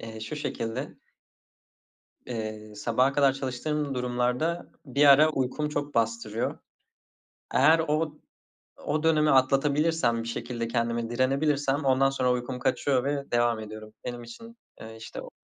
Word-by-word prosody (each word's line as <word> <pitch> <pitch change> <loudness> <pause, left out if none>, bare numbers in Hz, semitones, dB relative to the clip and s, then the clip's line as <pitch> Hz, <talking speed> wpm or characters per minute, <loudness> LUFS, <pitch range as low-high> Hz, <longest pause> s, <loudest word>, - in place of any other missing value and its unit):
Eee, 110 -1 -8
şu 150 +7 -5
şekilde 115 -5 -4 1.3
Eee, 110 -2 -6
sabaha 125 +6 +1
kadar 140 -2 +4
çalıştığım 135 +2 -3
durumlarda 125 +7 -1 0.2
bir 140 +2 +2
ara 145 +3 +7
uykum 150 +2 -1
çok 145 -1 -3
bastırıyor. 115 -1 -1 1.0
Eğer 155 +5 +6
o 155 0 -1 0.7
o 150 +1 0
dönemi 155 -2 +3
atlatabilirsem 135 -1 +2
bir 115 - -6
şekilde 115 0 -4
kendime 115 -1 -1
direnebilirsem 140 +2 +1
ondan 135 +1 +3
sonra 130 -2 +1
uykum 125 +1 -3
kaçıyor 130 0 +1
ve 140 0 -2
devam 120 -1 +2
ediyorum. 110 0 -9
Benim 120 -1 -5
için, 230 - -12 0.2
eee, 110 0 -9
işte, 110 - -8
o - - -10
130 Hz, 130 wpm, -27 LUFS, 115-145 Hz, 1.3 s, ara